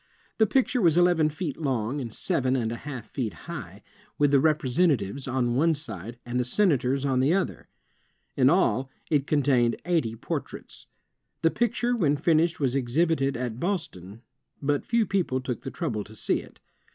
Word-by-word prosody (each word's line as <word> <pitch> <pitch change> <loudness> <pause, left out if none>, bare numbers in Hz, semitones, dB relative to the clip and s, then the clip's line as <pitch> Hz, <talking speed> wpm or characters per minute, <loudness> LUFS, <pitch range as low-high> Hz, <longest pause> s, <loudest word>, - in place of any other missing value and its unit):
The 220 - +5
picture 255 +1 +1
was 170 -3 +4
eleven 175 -3 +4
feet 155 -1 -4
long 135 -2 -1
and 120 -3 -5
seven 130 +3 0
and 115 -3 -1
a - - -3
half 125 -2 -7
feet 120 -6 -3
high, 105 - -8 0.3
with 145 -1 +3
the 140 - +5
Representatives 140 - +1
on 125 -2 0
one 160 +6 +3
side, 115 - -6
and 120 +1 -2
the - - +2
Senators 135 - +1
on 130 -2 +1
the 140 +7 +3
other. 195 - -2 0.7
In 130 -1 +5
all, 135 - +2 0.2
it 145 -3 +2
contained 130 -6 +2
eighty 160 -11 0
portraits. - - -6 0.6
The 165 - +4
picture 240 +1 0
when 150 -10 +2
finished 165 +2 +2
was 135 -4 +1
exhibited 135 +1 +1
at 120 -2 -4
Boston, 115 - -4 0.4
but 145 0 0
few 230 -1 +1
people 180 -10 0
took 125 -1 -4
the - - -5
trouble 125 -10 -3
to 110 - -13
see - - 0
it. - - -14
140 Hz, 170 wpm, -26 LUFS, 125-165 Hz, 0.7 s, The